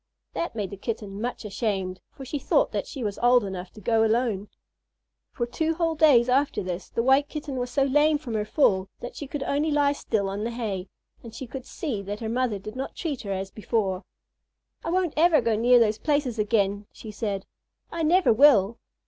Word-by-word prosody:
That 335 - -3
made 205 -4 -3
the 200 - -7
Kitten 205 -1 -5
much 240 -1 -4
ashamed, 195 -3 -2
for 270 - -11
she 285 +3 -3
thought - - +2
that - - -3
she 270 -5 -6
was 205 -2 -3
old 245 0 +5
enough 185 -2 -5
to - - -12
go 225 +2 +2
alone. 220 -3 +1 0.8
For 240 - -2
two 320 +7 -1
whole 330 -1 +1
days 290 -7 +5
after 270 -1 +1
this 180 0 -5
the 230 - -1
White 270 +3 +4
Kitten 295 -3 -5
was 245 0 -2
so 275 +2 +2
lame 295 +3 +3
from 275 -6 -7
her 215 -1 0
fall 200 -5 +2
that 245 - -7
she 290 - -6
could 285 0 -4
only 295 +3 0
lie 290 -1 +3
still 215 -7 -1
on 200 +2 -3
the 230 - -1
hay, 205 -6 -4 0.3
and 230 -1 -11
she 260 - -6
could 260 +1 -8
see 260 - -4
that 205 +1 -5
her 225 - -4
mother 240 -2 0
did 215 +3 -9
not 265 +1 -5
treat 300 -7 -3
her 200 - -5
as 190 0 -3
before. 200 -3 -1 0.8
"I - - -3
won't 360 -2 +1
ever 325 0 +5
go 230 -2 +1
near 245 +3 +5
those 220 -2 +3
places 285 -6 0
again," 205 -1 +1
she 220 - -10
said. 205 -2 -3 0.5
"I 335 - -3
never 340 -3 +4
will." 235 -4 +5
235 Hz, 210 wpm, -26 LUFS, 205-280 Hz, 0.8 s, old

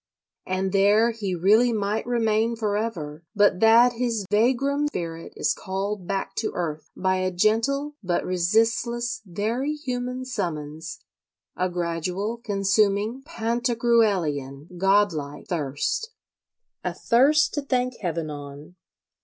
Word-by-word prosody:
And 185 +1 -1
there 205 +4 +4
he 205 -5 -3
really 215 +8 +4
might 210 +1 -1
remain 225 -1 +1
for 215 -3 -1
ever, 170 -8 -4
but 205 -3 +4
that 230 +3 +6
his 230 -4 -1
vagrom 270 +6 +2
spirit 165 - -5
is - - +1
called 195 0 -4
back 195 0 -2
to 220 - 0
earth 155 -3 -4
by 185 0 +1
a 185 0 0
gentle 225 +10 +1
but 180 -3 -1
resistless, 225 +6 +1
very 230 - -1
human 250 -2 -4
summons,—a 165 - -6
gradual, 180 +5 -2
consuming, 205 +2 +1
Pantagruelian, 225 - 0
god 195 +1 +3
like, 145 -1 -6
thirst: 155 - -2 0.7
a - - -3
thirst 280 +6 +3
to 290 - -1
thank 255 -3 -1
Heaven 165 -4 -3
on. 145 +4 -10
205 Hz, 120 wpm, -25 LUFS, 175-235 Hz, 0.7 s, that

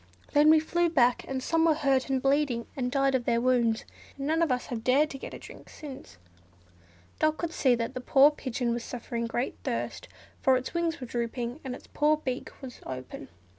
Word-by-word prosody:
Then 295 +1 +6
we 315 0 +7
flew 345 +2 +1
back, 250 -6 +3
and 260 -1 -3
some 325 +2 +2
were 320 -2 +4
hurt 275 -3 +1
and 265 -1 +1
bleeding, 270 -3 +1
and 250 -2 -2
died 275 0 +2
of 250 -2 0
their 235 -1 +2
wounds, 235 -2 +2 0.3
and 275 - -4
none 320 +3 +1
of 330 -5 +2
us 250 0 0
have 225 -2 -5
dared 280 +5 +3
to 275 - -7
get - - -7
a - - -6
drink - - -13
since." 260 - -10 1.0
Dot 310 0 +2
could 335 -1 -3
see 255 -5 +3
that 230 +1 -3
the 255 - -5
poor 275 +3 +6
pigeon 250 -4 -2
was 235 0 -3
suffering 235 -1 -4
great 240 +3 -2
thirst, - - -3 0.3
for 265 -1 +4
its 255 - -5
wings 340 -1 -1
were 255 - -5
drooping, 240 +2 -3
and 260 -3 -4
its - - -13
poor 300 +1 +2
dry 305 - -14
beak 255 -1 -3
was 255 -2 -8
open. 130 -1 -7
260 Hz, 215 wpm, -28 LUFS, 240-300 Hz, 1.0 s, we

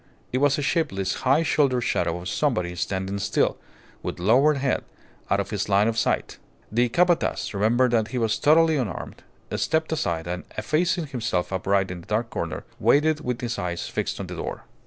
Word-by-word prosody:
It 130 - +2
was 145 0 +3
a 145 - -2
shapeless, 95 - 0 0.2
high 145 +5 +5
shouldered 140 -5 +2
shadow 85 -5 0
of 90 - -7
somebody 95 -7 0
standing 95 +2 -2
still, 100 - +1 0.4
with - - -4
lowered 130 +11 +4
head, 135 -1 0 0.5
out - - +2
of - - -3
his - - -2
line 100 +2 +4
of 115 - 0
sight. - - -1 0.3
The 120 +3 +2
Capataz, 175 0 +1
remembering 115 +5 +2
that 110 -2 +2
he 125 - -4
was 110 -2 +1
totally 160 +1 +5
unarmed, 120 -8 -4 0.3
stepped 160 0 0
aside, 85 - -1
and, 90 +1 -4
effacing 160 +9 +1
himself 120 -10 -2
upright 95 0 +1
in 90 - -6
a - - -11
dark 110 +5 -2
corner, - - -4 0.2
waited 155 +1 +3
with 125 -5 -3
his 120 -3 -3
eyes 90 -2 -3
fixed - - -3
on - - -3
the - - -7
door. - - -5
120 Hz, 185 wpm, -25 LUFS, 95-145 Hz, 0.5 s, high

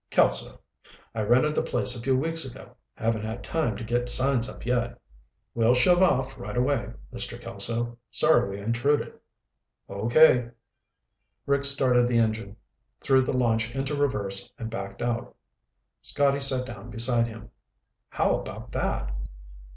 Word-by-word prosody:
"Kelso. - - +1 0.5
I 110 - -2
rented 125 +8 +3
the - - +1
place 125 - +1
a 120 - -6
few 130 +1 +1
weeks 165 +4 0
ago. 130 0 -10 0.2
Haven't 110 -2 -1
had 110 +2 -5
time 150 -11 -1
to - - -7
get 120 +2 -1
signs 130 -1 +4
up - - -10
yet." 120 -1 -1 0.5
"We'll 115 +1 +3
shove 175 +8 +4
off 135 -7 +1
right 120 - -6
away, 125 -2 0 0.2
Mr. 120 0 -5
Kelso. 120 0 -3
Sorry 155 -9 +3
we 100 +1 -6
intruded." 120 +7 0 0.7
"Okay." 120 +4 +4 1.0
Rick 140 0 +1
started 130 -3 +4
the 120 -1 +1
engine, 110 -3 0 0.4
threw 135 -1 +3
the 130 0 -1
launch 115 -1 0
into 135 +2 -2
reverse, 105 -9 -2
and 115 -3 -6
backed 100 -2 -6
out. 120 -1 -3 0.7
Scotty 140 -1 +1
sat 130 -2 0
down 120 -3 -9
beside 115 +1 +2
him. 110 -2 -11 0.6
"How - - +1
about - - -9
that?" - - -2
120 Hz, 145 wpm, -26 LUFS, 115-135 Hz, 1.0 s, signs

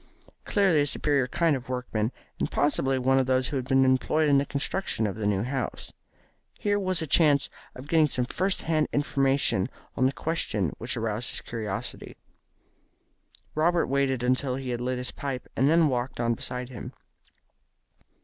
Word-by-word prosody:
Clearly 190 -7 +3
a 145 - +1
superior 140 -2 +1
kind 165 +3 +2
of 130 -1 -7
workman, 125 -3 -2 0.3
and - - 0
possibly 135 -2 +1
one 135 +1 +3
of 130 - 0
those 130 -1 +2
who 145 - -4
had 130 -2 -2
been 135 0 +4
employed 145 +4 +2
in 140 -1 +5
the 140 - -1
construction 140 - -1
of 100 - -2
the 105 -1 -2
new 100 -1 +1
house. 130 0 -4 0.6
Here 205 0 0
was 185 -4 0
a - - -2
chance 145 -2 +3 0.2
of 130 +3 -10
getting 155 0 +4
some 125 -3 -1
first 190 +9 -1
hand 155 -2 +1
information 135 -7 +2 0.3
on 130 - +3
the - - 0
question 110 - -2
which 120 +3 -1
had 120 - -3
aroused 110 +1 -1
his - - -3
curiosity. 110 -1 -5 1.4
Robert 170 +2 +2
waited 135 -2 0
until 130 +1 +1
he 130 -1 -4
had 120 0 -3
lit 125 +1 -1
his 125 0 -4
pipe, 135 -3 -5
and 135 +3 +3
then 165 0 +5
walked 125 -2 -2
on 120 0 +1
beside 125 +2 -4
him. 125 - -8
130 Hz, 180 wpm, -27 LUFS, 125-145 Hz, 1.4 s, in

